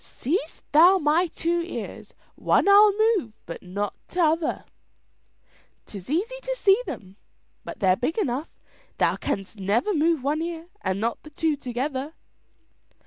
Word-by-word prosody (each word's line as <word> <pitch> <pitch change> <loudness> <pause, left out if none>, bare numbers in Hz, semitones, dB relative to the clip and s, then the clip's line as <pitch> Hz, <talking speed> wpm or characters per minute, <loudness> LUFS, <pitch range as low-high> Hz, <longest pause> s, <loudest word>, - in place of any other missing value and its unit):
"Seest 315 +4 -3
thou 345 +6 +7
my 320 +2 +2
two 340 +1 -1
ears! 345 - -7 0.2
One - - +2
I'll 410 +1 +8 0.2
move 345 - -1
but 170 - -8
not 200 +3 -3
t'other." 330 -2 0 1.2
"'Tis 195 -1 -10
easy 435 - -1
to - - -3
see 415 -2 +4
them, 190 0 -8 0.6
they're 185 -2 +3
big 255 - -2
enough, 285 - -1
but - - -34
thou - - +2
canst 195 +2 -4
never 215 - +1
move 320 -3 +1
one 295 +3 0
ear 335 0 -5
and 190 0 -1
not 230 +2 -2
the 305 - -13
two 310 +1 0
together." 270 +3 -4
305 Hz, 140 wpm, -25 LUFS, 235-345 Hz, 1.2 s, I'll